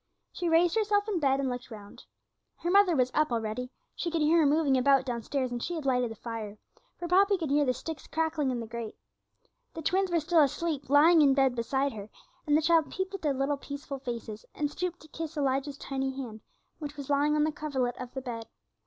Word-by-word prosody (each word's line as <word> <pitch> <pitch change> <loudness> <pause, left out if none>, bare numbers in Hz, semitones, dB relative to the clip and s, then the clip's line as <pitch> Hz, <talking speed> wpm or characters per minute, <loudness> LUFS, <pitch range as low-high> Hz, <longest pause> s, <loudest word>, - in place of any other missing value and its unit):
She 350 - -2
raised 335 +3 +4
herself 420 -1 +2
in 400 -5 0
bed 275 -2 +2
and 275 - 0
looked 245 -1 -5
round. 205 -3 -11 0.5
Her 345 - -2
mother 395 -3 +5
was 255 -2 +2
up 305 -3 +2
already; 230 +2 -2 0.2
she 345 - -3
could 330 -2 0
hear 325 +3 +4
her 315 - +4
moving 290 -2 +3
about 270 +1 +4
downstairs, 250 +1 -2
and 240 -1 -3
she 345 - -3
had 315 -4 -5
lighted 250 -2 +1
the 225 - -7
fire, 220 -3 -6 0.4
for 345 - -5
Poppy 395 +3 +4
could 320 -6 -3
hear 290 0 +3
the 255 - +2
sticks 320 +4 -7
crackling 320 -3 0
in 250 -2 -2
the 230 - -5
grate. 230 -1 -7 0.8
The 325 - -6
twins 380 +4 +1
were 340 -1 +2
still 325 +1 +3
asleep, 290 0 -1
lying 310 +4 +6
in 275 -2 +5
bed 270 -2 +3
beside 265 +4 0
her, 210 -1 -8 0.4
and 295 0 +4
the 315 - 0
child 325 -1 +3
peeped 380 +1 -3
at 390 - -5
their 300 - +1
little 275 +2 0
peaceful 280 0 -7
faces, 230 -4 -6
and 295 -1 -1
stooped 350 +2 -4
to 310 - -14
kiss 320 0 -6
Elijah's 275 0 0
tiny 270 -1 -3
hand, 225 -5 -6 0.4
which 295 -1 -7
was 285 0 -5
lying 290 +1 +3
on 300 - +3
the 310 - +1
coverlet 265 -5 -2
of 250 -1 -7
the 265 - -3
bed. 230 -3 -6
285 Hz, 225 wpm, -29 LUFS, 255-325 Hz, 0.8 s, lying